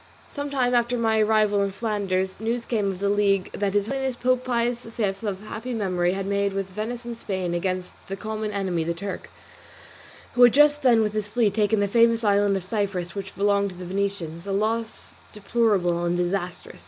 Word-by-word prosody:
Some 285 0 -5
time 255 -3 +1
after 240 0 +2
my 225 -1 +2
arrival 215 -1 +3
in 200 - +1
Flanders 195 -3 -2
news 230 +2 -2
came 215 -4 0
of 190 - -4
the 200 +2 -1
league 200 -2 +2
that 200 -1 -1
his 205 -1 +2
Holiness 265 +1 -2
Pope 255 +1 +1
Pius 240 -1 0
V 225 -1 -5 0.2
of 195 -1 -3
happy 225 +3 -5
memory, 180 -4 0
had 195 0 -3
made 200 0 0
with 195 0 -1
Venice 230 +5 -5
and 240 -1 -5
Spain 185 -6 -3
against 185 +1 -3
the 195 - -4
common 215 +1 -4
enemy, 190 -5 -1
the 170 +1 -2
Turk, 200 +4 -6 1.0
who 245 - +1
had 245 -2 +8
just 295 +1 +5
then 240 -5 +5
with 210 -1 -1
his 215 -1 -2
fleet 215 -2 +1
taken 210 0 +2
the 200 - +2
famous 230 +2 +3
island 205 -1 +3
of 190 - -5
Cyprus, 190 -3 -2
which 195 -1 -6
belonged 200 0 +2
to 185 - -11
the 180 0 -8
Venetians, 185 -2 -3
a - - -2
loss 220 +3 -2 0.2
deplorable 200 -5 +1
and 175 0 0
disastrous. 180 0 -3
205 Hz, 200 wpm, -25 LUFS, 190-230 Hz, 1.0 s, had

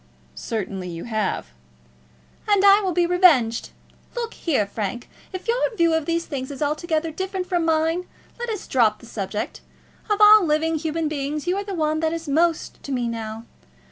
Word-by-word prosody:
"Certainly 195 -4 -4
you 170 -1 -6
have." 215 - -2 1.0
"And 405 -1 +4
I 400 +1 +7
will 380 -2 -1
be 350 0 +2
revenged. 330 -11 +4 0.5
Look 470 -1 -3
here, 275 - 0
Frank; 215 +4 -4 0.2
if 370 +4 -7
your 475 +2 +1 0.2
view 335 -1 +3
of 320 -2 0
these 335 0 0
things 260 -3 -5
is 280 -2 -7
altogether 310 +2 -1
different 375 +2 -3
from 350 -2 0
mine, 325 +2 +1 0.3
let 480 0 -3
us 425 -4 -4
drop 225 -5 +2
the - - -15
subject. 210 -2 -4 0.5
Of 420 0 +1
all 420 -1 +8
living 320 0 +1
human 320 0 -2
beings 295 0 -3
you 355 +1 +1
are 400 - -2
the 400 -1 -5
one 310 -1 0
that 320 0 0
is 330 -1 -5
most 325 +3 0
to 280 - -7
me 245 -2 -1
now. 225 -1 -5
320 Hz, 180 wpm, -23 LUFS, 245-360 Hz, 1.0 s, all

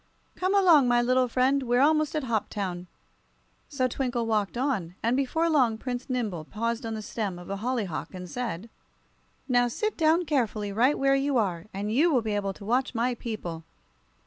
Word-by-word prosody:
Come 370 +2 0
along, 340 -9 +6
my 240 0 +4
little 255 +1 +2
friend; 260 +3 +2
we're 245 -1 +1
almost 305 +2 +3
at 305 - -1
Hoptown." 200 -6 -3 0.8
So 265 -4 0
Twinkle 245 -2 -2
walked 215 -1 0
on, 225 -11 -1
and 230 +2 +2
before 275 +5 +1
long 255 -9 +3
Prince 245 +2 -5
Nimble 215 -10 -2
paused 230 +6 -3
on 225 - -3
the 215 - -6
stem 205 -4 -3
of 175 +2 -9
a 200 - -2
hollyhock 215 -6 -3
and 180 0 -7
said: 230 -1 -5 0.8
"Now, 245 -2 +3
sit 430 - -2
down 330 +2 +3
carefully, 225 -8 -1
right 245 +8 +3
where 275 0 +3
you 275 0 +1
are, 185 -5 -1
and 205 +2 -3
you 320 +8 +4
will 250 -6 +2
be 215 -1 -2
able 200 -1 -1
to 200 - -12
watch 250 +3 0
my 240 +2 +1
people. 210 -9 -6
240 Hz, 185 wpm, -27 LUFS, 210-270 Hz, 0.8 s, along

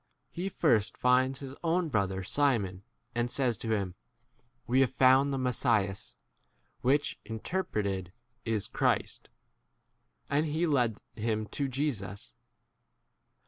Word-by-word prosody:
He 185 +3 -3
first 115 - +2
finds 130 +2 +3
his 135 -1 -6
own 170 0 +1
brother 95 -5 0
Simon, 105 -7 +1 0.3
and 120 0 0
says 125 -2 +1
to 115 - -4
him, 95 -3 -2 0.7
We 125 +2 +2
have 135 -2 +4
found 130 +2 +5
the 135 - -1
Mes 125 -2 -1
sias 100 -6 +1 0.7
(which 140 +4 +1
interpreted 105 - -2 0.3
is 110 -3 0
a - - -11
Christ). - - 0 1.0
42 - - -1
And 155 - +3
he 170 +2 +2
led 125 -8 +2 0.2
him 110 -1 -1
to 140 - -1
Jesus. 120 -8 -3
125 Hz, 130 wpm, -30 LUFS, 105-140 Hz, 1.0 s, found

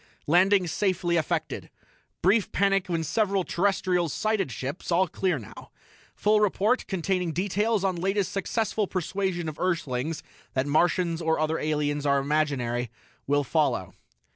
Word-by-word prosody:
_"Landing 185 +4 +4
safely 175 0 0
effected. 160 -4 -2 0.5
Brief 200 +4 +3
panic 195 -1 +2
when 165 -2 0
several 195 +4 +1
Terrestrials 180 -3 0
sighted 215 - 0
ships; 135 +9 -5
all 180 +2 +3
clear 180 -1 0
now. 110 -6 -11 0.5
Full 210 0 +3
report, 210 +4 +1
containing 180 -2 -1
details 205 +4 0
on 190 -2 0
latest 195 +2 0
successful 210 +1 -1
persuasion 185 -1 -2
of 155 -1 -6
Earthlings 160 -4 -1 0.3
that 130 0 +1
Martians 170 +3 +1
or 160 -1 +1
other 155 +1 0
aliens 145 -1 -1
are 140 0 +4
imaginary, 135 -5 0 0.4
will 145 +1 +2
follow." 125 - 0
175 Hz, 135 wpm, -26 LUFS, 150-195 Hz, 0.5 s, Landing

